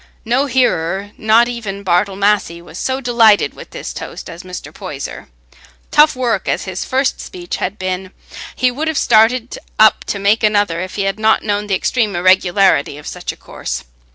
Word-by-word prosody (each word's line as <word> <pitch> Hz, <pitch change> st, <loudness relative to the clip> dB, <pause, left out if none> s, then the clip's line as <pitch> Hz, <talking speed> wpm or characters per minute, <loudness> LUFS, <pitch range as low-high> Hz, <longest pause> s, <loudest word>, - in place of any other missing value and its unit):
No 250 Hz, +5 st, +1 dB
hearer, 200 Hz, -6 st, 0 dB
not 220 Hz, +2 st, +4 dB
even 210 Hz, -5 st, -5 dB
Bartle 190 Hz, +2 st, +1 dB
Massey, 200 Hz, -4 st, +1 dB
was 170 Hz, 0 st, -11 dB
so 260 Hz, +1 st, -2 dB
delighted 230 Hz, -4 st, +4 dB
with -, -, -12 dB
this -, -, -7 dB
toast -, -, -8 dB
as 170 Hz, +1 st, -9 dB
Mr. 180 Hz, 0 st, -9 dB
Poyser. -, -, -7 dB, 0.6 s
"Tough 300 Hz, 0 st, +5 dB
work" 240 Hz, -6 st, -1 dB
as -, -, 0 dB
his 185 Hz, -1 st, -4 dB
first 265 Hz, +1 st, 0 dB
speech 175 Hz, -1 st, -6 dB
had 195 Hz, +3 st, -3 dB
been, 185 Hz, -1 st, -3 dB, 0.5 s
he 250 Hz, 0 st, +2 dB
would 300 Hz, +6 st, -3 dB
have 315 Hz, -2 st, -1 dB
started 230 Hz, +1 st, +3 dB, 0.2 s
up 215 Hz, 0 st, +5 dB
to -, -, -3 dB
make 200 Hz, +3 st, +2 dB
another 205 Hz, -5 st, +2 dB
if 185 Hz, 0 st, -6 dB
he 200 Hz, -, -1 dB
had 195 Hz, +2 st, -2 dB
not 220 Hz, 0 st, +3 dB
known 205 Hz, -1 st, -1 dB
the 195 Hz, -, +1 dB
extreme 215 Hz, 0 st, 0 dB
irregularity 185 Hz, -4 st, +3 dB
of 150 Hz, -, -12 dB
such -, -, -5 dB
a -, -, -14 dB
course. -, -, -6 dB
205 Hz, 180 wpm, -17 LUFS, 185-235 Hz, 0.6 s, Tough